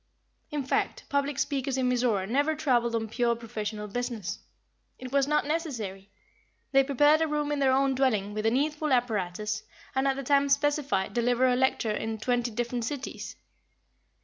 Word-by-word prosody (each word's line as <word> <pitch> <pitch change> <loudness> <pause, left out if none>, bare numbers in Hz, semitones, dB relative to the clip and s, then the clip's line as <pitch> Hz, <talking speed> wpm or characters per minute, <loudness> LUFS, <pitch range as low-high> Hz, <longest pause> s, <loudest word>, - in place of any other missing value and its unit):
In 295 -3 -2
fact, 260 - -1
public 280 -1 0
speakers 275 -1 -1
in 255 -1 +1
Mizora 240 -6 +1
never 285 +7 +1
traveled 245 -6 +1
on 225 -1 -1
pure 235 +1 +1
professional 215 -2 -5
business. 235 -2 -4 0.6
It 255 -1 -8
was 275 0 +2
not 300 0 +2
necessary. 235 - -3 0.6
They 270 0 +5
prepared 290 +3 +4
a 320 - +2
room 295 -1 -1
in 295 - 0
their 270 -1 +4
own 270 +1 +3
dwelling 220 -7 +1
with 215 +1 -3
the - - +5
needful 300 +4 0
apparatus, 215 -3 0 0.3
and 265 0 +1
at 270 - +2
the 275 - -4
time 280 +1 +3
specified 280 -9 +1
delivered 245 +2 +2
a 250 - +3
lecture 255 -3 +1
in 220 +1 -3
twenty 240 +2 0
different 240 +1 -2
cities. 275 +3 -5
255 Hz, 170 wpm, -28 LUFS, 225-280 Hz, 0.6 s, They